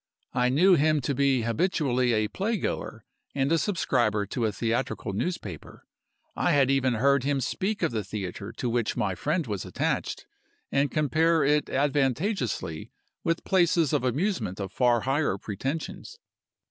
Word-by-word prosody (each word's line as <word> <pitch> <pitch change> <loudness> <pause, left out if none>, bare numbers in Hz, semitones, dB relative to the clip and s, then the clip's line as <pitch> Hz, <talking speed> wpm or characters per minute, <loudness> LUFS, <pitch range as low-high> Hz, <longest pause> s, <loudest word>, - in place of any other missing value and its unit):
I 125 0 +2
knew 175 +9 +5
him 155 -1 +3
to 135 +3 -1
be 135 -2 +2
habitually 125 - +1
a 110 -1 +1
play 210 - -1
goer - - -4 0.3
and 135 +1 +1
a 165 - +4
subscriber 120 - +1
to 115 +2 -1
a - - -1
theatrical 115 -2 -2
newspaper. 100 - -5 0.5
I - - +2
had 135 -2 +4
even 130 -3 +2
heard 140 +3 +3
him 140 0 +1
speak 190 - -2
of - - +2
the 110 -2 -2
theatre 100 +1 -6
to 125 - -3
which 120 -1 -1
my 95 - 0
friend 150 - -1
was 105 -5 -3
attached, - - -2 0.5
and 140 +1 +2
compare 160 +2 +2
it 150 +1 +2
advantageously 135 - -1 0.3
with 165 0 0
places 170 -5 +2
of - - +1
amusement 130 - -1
of 95 -1 -4
far 120 +3 +2
higher 135 -6 0
pretensions. 155 - -5
135 Hz, 155 wpm, -27 LUFS, 115-155 Hz, 0.5 s, knew